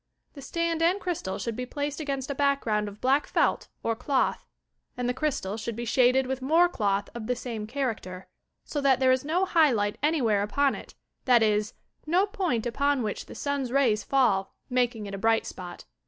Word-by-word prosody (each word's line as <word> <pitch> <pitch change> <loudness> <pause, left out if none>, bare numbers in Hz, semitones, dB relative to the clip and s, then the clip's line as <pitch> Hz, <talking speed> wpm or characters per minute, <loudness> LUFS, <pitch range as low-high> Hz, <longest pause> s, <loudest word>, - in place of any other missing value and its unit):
The 280 - -10
stand 335 +3 -1
and 350 +4 +3
crjstal 315 - -3
should 230 +3 -3
be 250 +1 -4
placed 285 +2 -3
against 275 -3 -3
a - - -1
background 270 -7 +1
of 205 0 -9
black 270 +3 +2
felt - - +1 0.2
or 230 - 0
clotli, 260 +3 +1 0.6
and 250 -1 -1
the 250 - +1
crystal 255 -8 -2
should 230 0 -4
be 240 +1 -4
shaded 255 +2 +3
with 265 0 -3
mora 330 +6 +4
cloih 200 - 0
of 230 -2 -6
the 250 - 0
same 230 -3 -5
character, 220 -8 -4 0.4
so 290 - -3
that 270 -2 +3
there 260 -1 +4
is 255 0 +2
no 340 +6 +1
high 330 -5 +4
light 205 -3 -1
anywhere 260 -9 +2
upon 270 +7 +1
it, - - -10 0.3
that 245 -3 +5
is, 210 -1 +1 0.3
no 360 +5 +3
point 360 - -1
upon 280 +2 +1
which 210 - -4
the - - -10
sun 280 -3 -2
'a - - -7
rays 230 -7 +3
fall, 210 -8 +1 0.2
making 245 -3 0
it 200 - -7
a 195 - -4
bright 225 +1 +2
spot. 180 -1 -8
255 Hz, 200 wpm, -27 LUFS, 215-285 Hz, 0.6 s, that